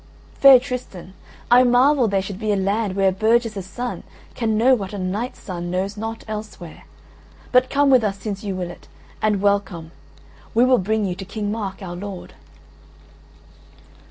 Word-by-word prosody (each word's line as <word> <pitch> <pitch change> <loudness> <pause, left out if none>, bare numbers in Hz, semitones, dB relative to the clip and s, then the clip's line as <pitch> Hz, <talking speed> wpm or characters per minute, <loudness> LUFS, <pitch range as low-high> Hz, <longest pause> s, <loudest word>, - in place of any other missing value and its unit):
"Fair 275 -2 +9
Tristan, 245 -8 -7 0.4
I 245 +1 +8
marvel 255 +1 +4
there 195 -2 0
should 195 0 -7
be 215 -1 -1
a - - +2
land 200 +1 -1
where 195 -1 +3
a - - -1
burgess's 215 -1 0
son 245 +6 -5 0.3
can 220 -2 -1
know 250 +4 +5
what 200 -5 -2
a - - -4
knight's 200 +6 -3
son 175 -2 -6
knows 190 +3 -2
not 225 +1 -6
elsewhere, 210 -6 -8 0.7
but 255 0 +4
come 285 0 +3
with 255 -3 +5
us 200 -2 -1
since 195 0 -6
you 200 -2 -3
will 180 -1 -4
it; - - -15 0.3
and 210 -2 +1
welcome: 195 -5 0 0.6
we 240 +2 +5
will 255 -1 +4
bring 215 +3 0
you 185 - -2
to 190 - -8
King 205 +2 -4
Mark, 200 -3 -5
our 175 -2 -6
lord." 195 0 -8
205 Hz, 175 wpm, -21 LUFS, 190-235 Hz, 0.7 s, Fair